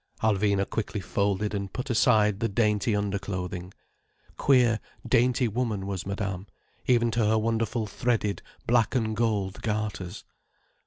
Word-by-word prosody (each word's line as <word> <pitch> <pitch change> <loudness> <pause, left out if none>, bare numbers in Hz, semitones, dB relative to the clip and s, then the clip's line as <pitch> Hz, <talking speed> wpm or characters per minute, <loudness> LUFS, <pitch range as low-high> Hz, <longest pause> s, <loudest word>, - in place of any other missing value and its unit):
Alvina 100 -2 +2
quickly 110 -1 -3
folded 100 +2 -1
and 100 -2 -3
put 125 +1 -3
aside 110 -4 +4
the 115 -1 0
dainty 105 +1 +1
underclothing. 95 -3 -3 0.6
Queer, 125 -5 +4 0.3
dainty 125 0 +3
woman, 110 -3 -2
was 95 -1 -4
Madame, 100 -1 -3 0.4
even 120 -2 +3
to 115 0 +1
her 110 +1 +3
wonderful 115 0 0
threaded 105 -1 -1 0.2
black 120 0 +2
and 110 -3 0
gold 105 -4 -1
garters. 105 -4 -3
105 Hz, 125 wpm, -27 LUFS, 100-115 Hz, 0.6 s, aside